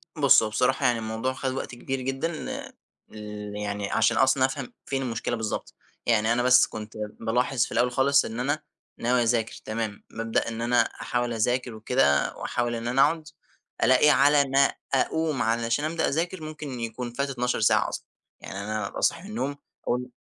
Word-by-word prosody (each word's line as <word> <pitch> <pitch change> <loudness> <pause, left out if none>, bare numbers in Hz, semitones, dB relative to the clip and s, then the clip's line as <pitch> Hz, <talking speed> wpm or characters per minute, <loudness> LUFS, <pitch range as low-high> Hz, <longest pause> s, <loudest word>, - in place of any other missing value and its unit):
بُص 140 -6 +6
هو 110 - -1
بصراحة 130 +4 +1
يعني 120 -2 +3
الموضوع 110 +4 -2
خَد 130 0 -2
وقت 130 - -5
كبير 135 +2 -4
جدًا، 135 +6 -2 0.8
ال 105 -1 -7
يعني 105 -1 -3
عشان - - +3
أصلًا 130 0 +4
أفهم 135 -1 -4
فين 135 -1 -2
المشكلة 120 -1 -2
بالضبط. 110 -2 -4 0.3
يعني 115 -1 +3
أنا 120 +1 +1
بس 125 0 +6
كنت 110 0 -8 0.3
بالاحظ 125 +2 +1
في - - -11
الأول 125 +1 +2
خالص، 140 +2 +3
إن 115 +1 -5
أنا 145 +5 0 0.4
ناوي 120 +1 +2
أذاكر 115 -1 +1
تمام، 110 -2 -4
بابدأ 115 0 -1
إن 115 0 -4
أنا 120 +1 +3
أحاول 120 -1 -2
أذاكر 120 +2 0
وكده 110 - +2
وأحاول 120 -1 -2
إن 115 +1 -4
أنا 130 +3 +3
أقعد، 160 -2 +2 0.6
ألاقي 130 +3 +6
على 145 0 +5
ما 140 +1 +4 0.2
أقوم 155 +1 +1
علشان 115 +5 +1
أبدأ 160 +1 0
أذاكر 170 +4 -2
ممكن 150 -5 -6
يكون 115 +1 -4
فات 140 +2 -1
12 125 -2 -1
ساعة 110 - +3
أصلًا. - - -6 0.4
يعني 95 - -7
أنا 105 0 -3
أبقي - - -7
صاحي - - +1
من 205 - -10
النوم 145 -10 -2 0.3
أقول 125 +1 -1
125 Hz, 180 wpm, -26 LUFS, 115-135 Hz, 0.8 s, بُص